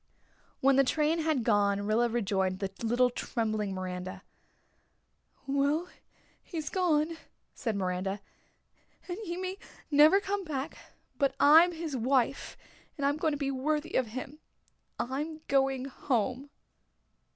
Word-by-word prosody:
When 270 0 +4
the 275 - +6
train 305 +4 +1
had 310 -6 +1
gone 205 -3 +2
Rilla 225 +3 +2
rejoined 195 -5 0
the 195 -1 -3
little 245 +2 +2
trembling 215 -5 -2
Miranda. 185 +1 -5 1.2
"Well, 280 +5 +1 0.5
he's 315 -4 -5
gone," 330 -3 +1 0.4
said 225 -4 -3
Miranda, 190 +1 -2 0.9
"and 355 +2 -4
he 345 -1 -4
may 375 +1 -4 0.3
never 300 +6 +7
come 400 0 -2
back 295 -3 -4 0.4
but 275 -2 +2
I'm 320 +5 +7
his 325 -4 -5
wife, 260 +2 0 0.4
and 280 - -1
I'm 285 +1 +2
going 310 0 0
to - - -2
be 275 -1 -1
worthy 300 +4 -1
of 255 - +2
him. 260 +6 -7 0.6
I'm 300 +5 -3
going 270 -1 +2
home." 260 0 -2
270 Hz, 130 wpm, -30 LUFS, 225-310 Hz, 1.2 s, never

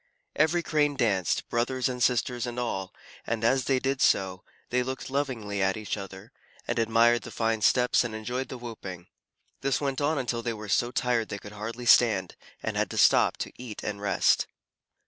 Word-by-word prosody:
Every 160 +3 +2
Crane 150 -2 +1
danced, 100 - +1
brothers, 125 +2 0
and 125 -1 -4
sisters, 120 0 +1
and 120 0 -5
all, 95 -6 -3 0.4
and 115 -1 -2
as 130 +2 +3
they 135 - +2
did 135 +1 -1
so, 95 -1 +2 0.3
they 125 +1 +2
looked 130 +1 -5
lovingly 120 -8 -2
at 95 +2 +1
each 110 -1 -3
other, 95 -2 -9 0.4
and - - -1
admired 115 +1 +4
the - - -9
fine 115 -1 -1
steps 125 +4 +4
and 115 -2 -4
enjoyed 120 +4 -4
the 130 - -6
whooping. 100 -7 -8 0.6
This 135 -2 +1
went 140 -1 -2
on 150 +2 +1
until 120 -3 -1
they 115 0 -2
were 105 -1 -8
so 120 +5 +2
tired 120 -2 0
they 100 - -4
could 100 0 -11
hardly 115 +4 -6
stand, 105 -7 +4 0.3
and - - -2
had - - +1
to - - -6
stop - - +5
to - - -4
eat 115 -4 -7
and 100 -1 -4
rest. 100 -1 +2
120 Hz, 190 wpm, -27 LUFS, 105-130 Hz, 0.6 s, stop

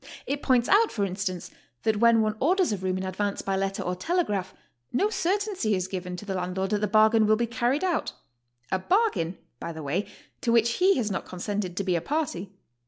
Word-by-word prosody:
* - - -20
It 285 +1 -2
points 250 -3 +3
out, 435 +3 +4
for 205 -3 0
instance, 185 -1 -4 0.3
that 220 -1 +2
when 230 -1 +5
'one 215 0 0
orders 365 - +2
a 205 - 0
roiom 185 0 -1
in 185 - -3
advance 200 +2 -2
by 195 - -1
letter 195 0 -1
or 180 - -2
telegraph, 205 - -1 0.4
no 405 - +1
certainty 380 - 0
is 185 -1 -2
given 180 -1 -5
to 210 - -8
the 195 - -3
landlord 185 +1 -2
that 210 -1 +1
the 210 - +1
bargain 215 +1 +5
will 215 - +5
be 235 +2 0
carried 240 +6 0
out, 360 -3 0 0.3
— 120 0 -36
a 190 - +1
bargain, 275 - +1 0.2
by 170 - -5
the 160 -1 -7
way, 175 +9 -1 0.3
to 235 - +1
which 230 0 +4
he 380 +2 +4
has 220 -5 -1
not 190 - -3
consented 185 0 -4
to 200 - 0
be 185 -2 +1
a 170 - 0
party. 275 - -2
210 Hz, 225 wpm, -27 LUFS, 185-250 Hz, 0.4 s, when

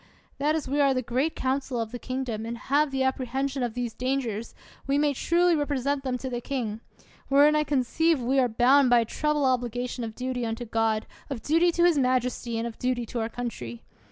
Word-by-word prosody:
That 300 +2 +2
as 315 - -3
we 285 +2 +1
are 275 -2 +4
the 255 - 0
great 260 +7 -1
council 260 -1 -1
of 225 -1 -3
the 245 - -6
kingdom, 255 -4 -3
and 230 +1 -5
have 285 +4 +1
the 270 -1 -2
apprehen 265 +1 -1
sion 275 -1 -4
of 240 -2 -2
these 245 -2 -3
dangers, 245 -4 -2 0.3
we 275 +1 +2
may 290 0 +2
truly 345 +5 +2
represent 285 -2 -1
them 255 -2 -1
to 260 - -6
the 240 -2 -3
king; 230 -5 -3 0.5
wherein 290 +2 +5
I 300 - +3
conceive 300 +3 +1
we 255 +3 +1
are 250 -2 +3
bound 255 +4 +4
by 240 -1 +6
a - - -1
treble 300 +4 0
obligation 245 -1 -1
of 220 -1 -6
duty 255 -1 -3
unto 230 +1 -3
God, 225 -1 0 0.2
of 260 -5 -5
duty 330 +3 +3
to 345 - +2
his 345 -4 +4
majesty, 250 -2 0
and 225 - -2
of 235 -1 -7
duty 250 -1 -1
to 235 - -4
our 225 0 -1
country. 125 - -6
255 Hz, 215 wpm, -26 LUFS, 235-280 Hz, 0.5 s, by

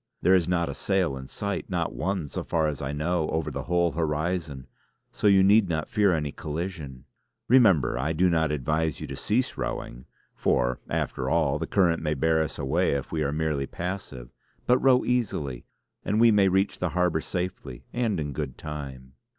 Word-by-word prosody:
There 95 - +5
is 90 -3 +3
not 85 -2 +1
a - - -4
sail 95 -7 0
in 65 0 -8
sight; - - -4
not - - -1
one, 90 -2 -2
so - - -4
far 80 -2 0
as 75 -3 -2
I 70 0 -3
know, 80 +2 -1
over 80 -1 -1
the 70 0 -5
whole 85 0 +2
horizon, 80 -3 -2 0.5
so - - 0
you 100 -1 +6
need 100 0 +5
not 80 -2 -1
fear 105 -3 +2
any 75 -4 -1
collision. 75 -5 -6 0.4
Remember, 100 - +4
I 75 +5 0
do 85 +3 +2
not 80 -3 +2
advise 75 +2 -1
you - - -5
to - - -6
cease 125 +5 -1
rowing; - - -5 0.3
for, 60 0 +1
after 65 0 -2
all, 75 -3 +1
the - - -3
current 85 -4 +2
may 75 -1 -1
bear 80 +3 +2
us 80 - -3
away 70 0 +1
if 70 -2 -3
we 80 - -1
are 70 -2 0
merely 75 -3 -1
passive. 85 -9 -6 0.4
But 125 +1 +4
row 130 -1 +4
easily; 95 - -1 0.4
and 105 - 0
we 115 0 +6
may 100 -2 +4
reach 95 +2 +1
the 90 - 0
harbour 90 -1 +1
safely 90 -9 -5
and 115 -7 0
in 75 -2 -3
good 70 -3 -4
time!" 70 -4 -7
80 Hz, 190 wpm, -26 LUFS, 70-95 Hz, 0.5 s, you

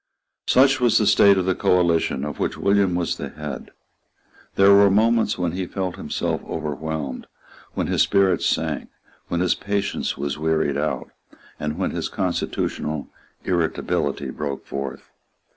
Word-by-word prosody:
Such 135 +1 +5
was 120 -2 +4
the 110 - +3
state 100 -1 +6
of 95 - 0
the 95 - +2
coalition 85 -6 +1
of 75 - -6
which - - -1
William 100 -2 +2
was 90 -1 -1
the - - -5
head. 75 -3 -7 0.9
There 100 +1 +6
were 100 0 +7
moments 110 +2 +2
when 90 -2 -1
he 90 +1 -3
felt 95 -2 -3
himself - - -3
overwhelmed, 75 -3 -4 0.5
when - - 0
his - - +1
spirits 95 -3 +3
sank, - - -1 0.4
when 85 - -1
his 90 - +3
patience 100 0 -2
was 70 +1 -3
wearied 80 -2 +1
out, 75 +2 -2 0.5
and 75 0 -3
when - - -1
his - - -3
constitutional 80 -4 -2 0.4
irritability 85 -4 -1
broke 70 -2 -5
forth. 70 -1 -6
90 Hz, 145 wpm, -22 LUFS, 75-100 Hz, 0.9 s, were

